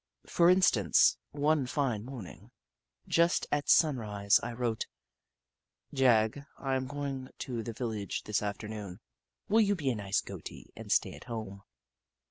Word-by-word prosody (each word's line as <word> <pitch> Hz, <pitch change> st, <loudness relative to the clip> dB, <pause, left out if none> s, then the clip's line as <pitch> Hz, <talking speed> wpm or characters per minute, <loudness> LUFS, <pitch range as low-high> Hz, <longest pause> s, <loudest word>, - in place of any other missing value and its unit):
For 170 Hz, 0 st, +4 dB
instance, 120 Hz, -, +4 dB
one 145 Hz, -2 st, +1 dB
fine 125 Hz, -6 st, -1 dB
morning, 115 Hz, -4 st, -10 dB, 0.6 s
just 170 Hz, +1 st, +2 dB
at 145 Hz, -1 st, -1 dB
sun 155 Hz, -5 st, +5 dB
rise, 105 Hz, -3 st, +2 dB
I 120 Hz, -, -4 dB
wrote: 115 Hz, -2 st, -2 dB, 1.1 s
"Jagg, 125 Hz, -1 st, +3 dB
I 135 Hz, -1 st, -2 dB
am 130 Hz, 0 st, -2 dB
going 140 Hz, -2 st, -5 dB
to 120 Hz, -3 st, -4 dB
the 115 Hz, +1 st, -6 dB
vil 120 Hz, +1 st, -3 dB
lage 105 Hz, -3 st, -4 dB
this 105 Hz, -, -1 dB
afternoon. 105 Hz, -2 st, -5 dB, 0.5 s
Will 220 Hz, +3 st, +4 dB
you 205 Hz, -1 st, +3 dB
be 145 Hz, -7 st, -1 dB
a -, -, -2 dB
nice 100 Hz, -2 st, 0 dB
Goatie -, -, -10 dB
and -, -, -8 dB
stay -, -, +2 dB
at -, -, -12 dB
home 110 Hz, -5 st, -6 dB
120 Hz, 150 wpm, -30 LUFS, 105-145 Hz, 1.1 s, sun